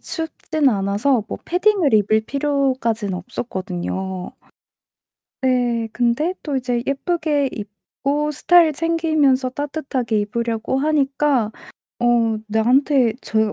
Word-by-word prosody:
춥진 320 -3 -1
않아서 205 +4 +1
뭐 - - -4
패딩을 365 - +2
입을 215 +1 +3
필요까지는 260 -7 0
없었거든요. 190 -3 -5 1.1
네, 245 -3 +1
근데 245 +9 +1
또 290 -3 -2
이제 245 -2 -1
예쁘게 290 -1 0
입고 275 +8 -3
스타일 330 +2 +4
챙기면서 310 -5 +1
따뜻하게 265 -5 -2
입으려고 230 +4 -2
하니까 275 -5 +1 0.5
어 235 -2 +2
나한테 245 +3 +3
제가 220 -1 0
255 Hz, 250 characters per minute, -20 LUFS, 220-295 Hz, 1.1 s, 스타일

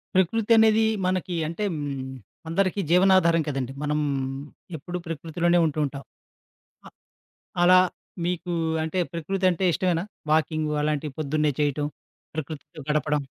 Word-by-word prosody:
ప్రకృతనేది 220 +3 +4 0.2
మనకి 185 -1 -1
అంటే 170 +6 -4
హ్మ్. 140 -3 -4 0.4
అందరికి 190 +3 +1
జీవనాధారం 180 -2 +5
కదండీ! 135 -3 -3
మనం 150 0 0 0.8
ఎప్పుడు 175 +4 -5
ప్రకృతిలోనే 165 +2 0
ఉంటూ 155 -1 -1
ఉంటాం. 140 0 -6 0.8
ఆ! - - -9 0.7
అలా 180 +1 +7 0.5
మీకు 175 0 -2 0.3
అంటే 160 +4 -2
ప్రకృతంటే 185 +2 0
ఇష్టమేనా? 175 0 0 0.3
వాకింగు 155 -1 +1
అలాంటివి 150 -1 -1
పొద్దున్నే 150 0 +1
చేయటం, 145 0 0 0.5
ప్రకృతితో 155 +1 -7
గడపడం? 150 0 +1
165 Hz, 110 wpm, -25 LUFS, 150-185 Hz, 0.8 s, అలా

